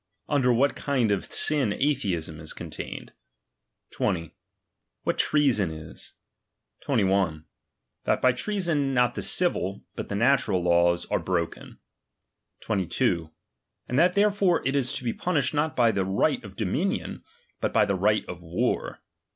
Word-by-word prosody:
Under 130 Hz, -4 st, +2 dB
what 135 Hz, +4 st, +2 dB
kind 130 Hz, -7 st, 0 dB
of 100 Hz, -, -2 dB
sin 140 Hz, -8 st, +1 dB
atheism 95 Hz, -, -1 dB
is 80 Hz, -1 st, -8 dB
con. -, -, -8 dB
tained. -, -, -7 dB, 0.8 s
20. 85 Hz, -5 st, -2 dB, 0.7 s
What -, -, -1 dB
treason 135 Hz, -, +2 dB
is. 80 Hz, 0 st, -9 dB, 0.7 s
21. 95 Hz, -, +1 dB, 0.6 s
That -, -, +2 dB
by 130 Hz, -, +4 dB
treason 155 Hz, -3 st, -1 dB
not 125 Hz, -1 st, +3 dB
the -, -, -4 dB
civil, 100 Hz, -, +1 dB
but -, -, -6 dB
the 100 Hz, -, -2 dB
natural 110 Hz, -5 st, +2 dB
laws 85 Hz, 0 st, +3 dB
are -, -, +2 dB
broken. 85 Hz, -1 st, -3 dB, 0.8 s
22. 95 Hz, -3 st, 0 dB, 0.6 s
And 125 Hz, -, 0 dB
that 175 Hz, +2 st, +4 dB
therefore 200 Hz, -6 st, +2 dB
it 135 Hz, -, 0 dB
is 130 Hz, -3 st, +1 dB
to -, -, -5 dB
be 115 Hz, -, -1 dB
punished 150 Hz, -7 st, 0 dB
not 150 Hz, 0 st, 0 dB
by 120 Hz, -2 st, +4 dB
the 100 Hz, -, 0 dB
right 95 Hz, +1 st, +1 dB
of -, -, -11 dB
dominion, -, -, -2 dB, 0.4 s
but -, -, -1 dB
by 105 Hz, -, +4 dB
the 100 Hz, -, 0 dB
right 105 Hz, +3 st, +2 dB
of 90 Hz, -1 st, -7 dB
war. 85 Hz, +1 st, -2 dB
115 Hz, 145 wpm, -26 LUFS, 90-140 Hz, 0.8 s, by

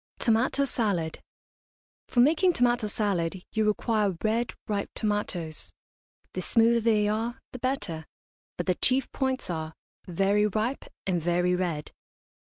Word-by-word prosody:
TOMATO 250 Hz, +4 st, +2 dB
SALAD. 200 Hz, -11 st, -1 dB, 0.9 s
For 240 Hz, -, +3 dB
making 325 Hz, +7 st, +4 dB
tomato 240 Hz, -5 st, +2 dB
salad 190 Hz, -4 st, -1 dB
you 220 Hz, -1 st, +1 dB
require 210 Hz, -3 st, +1 dB
red, 225 Hz, +2 st, 0 dB
ripe 205 Hz, -2 st, -1 dB
tomatoes; 175 Hz, -, -2 dB, 0.6 s
the 185 Hz, -, -2 dB
smoother 230 Hz, +4 st, +4 dB
they 215 Hz, -2 st, +3 dB
are 225 Hz, +4 st, -1 dB
the 250 Hz, -, -8 dB
better, 205 Hz, -, -2 dB, 0.5 s
but 175 Hz, -, -2 dB
the 185 Hz, -, +3 dB
chief 260 Hz, +7 st, +2 dB
points 265 Hz, -1 st, -1 dB
are 160 Hz, -1 st, -4 dB, 0.3 s
very 195 Hz, +4 st, +2 dB
ripe 220 Hz, +6 st, -2 dB, 0.2 s
and 180 Hz, -3 st, 0 dB
very 175 Hz, +2 st, +2 dB
red. 170 Hz, -5 st, -2 dB
210 Hz, 130 wpm, -27 LUFS, 180-240 Hz, 0.9 s, making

